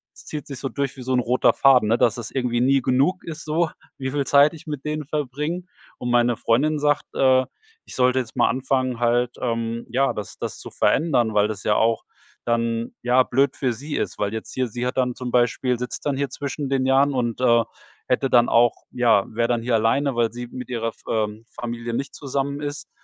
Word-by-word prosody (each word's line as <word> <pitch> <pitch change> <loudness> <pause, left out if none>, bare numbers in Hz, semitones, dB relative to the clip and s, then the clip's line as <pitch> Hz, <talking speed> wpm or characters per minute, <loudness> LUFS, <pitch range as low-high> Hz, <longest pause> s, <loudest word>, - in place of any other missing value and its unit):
Es - - -15
zieht 150 -3 -6
sich 140 -3 -7
so 135 - -3
durch 140 -1 -3
wie - - -8
so 130 +1 -2
'n 125 - +3
roter 125 +1 +3
Faden, 130 -5 +5
ne, 115 - +3
dass 120 0 +2
es 115 -3 -5
irgendwie 125 -3 0
nie 135 +2 +3
genug 140 +9 +1
ist 165 -1 -7
so, 160 +2 +1 0.3
wie 130 -1 -3
viel 140 0 -1
Zeit 145 +2 +5
ich 160 0 -13
mit 150 -3 -5
denen 150 0 -3
verbringe. 150 +4 -3 0.3
Und 125 - -4
meine 120 0 +3
Freundin 150 +7 +2
sagt, 145 0 +1
äh, 130 -1 +4 0.4
ich - - -10
sollte 125 0 +3
jetzt 125 -3 -6
mal - - +3
anfangen 130 -1 -1
halt, 120 0 +2
ähm, 115 -1 -2
ja, 135 +2 +1
das 105 - -7
das - - -5
zu - - -8
verändern, 130 -8 +2
weil 105 0 +3
das 105 -1 -6
ja 105 - +2
auch 115 -1 +2 0.4
dann, 115 0 -1
ja, 125 +1 +4
blöd 135 +2 +1
für 130 -3 0
sie 145 +6 -6
ist, - - -2
weil 100 -1 0
jetzt 110 - -6
hier 130 -1 0
sie 120 +2 -4
hat 125 +2 -3
dann 125 -1 +1
zum 125 -1 -5
Beispiel 125 0 +1
sitzt 125 -1 -5
dann 145 -2 0
hier 140 0 -1
zwischen 140 +1 -4
den 135 -1 +1
Jahren 135 +2 +3
und, 120 -3 -1
äh, 120 -2 +4 0.4
hätte 130 +1 +1
dann 120 -1 +4
auch 120 0 +4 0.2
ja, 115 -5 +3
wäre 115 +1 0
dann 120 -1 0
hier 120 0 +1
alleine, 120 +5 +1
weil 115 -1 +1
sie 120 0 -6
mit 125 +1 -8
ihrer 115 -2 -2
F - - -16
ähm, 110 0 -2
Familie 120 0 -5
nicht 135 +4 -3
zusammen 140 0 -3
ist. 145 -1 -5
125 Hz, 225 wpm, -23 LUFS, 120-140 Hz, 0.4 s, Faden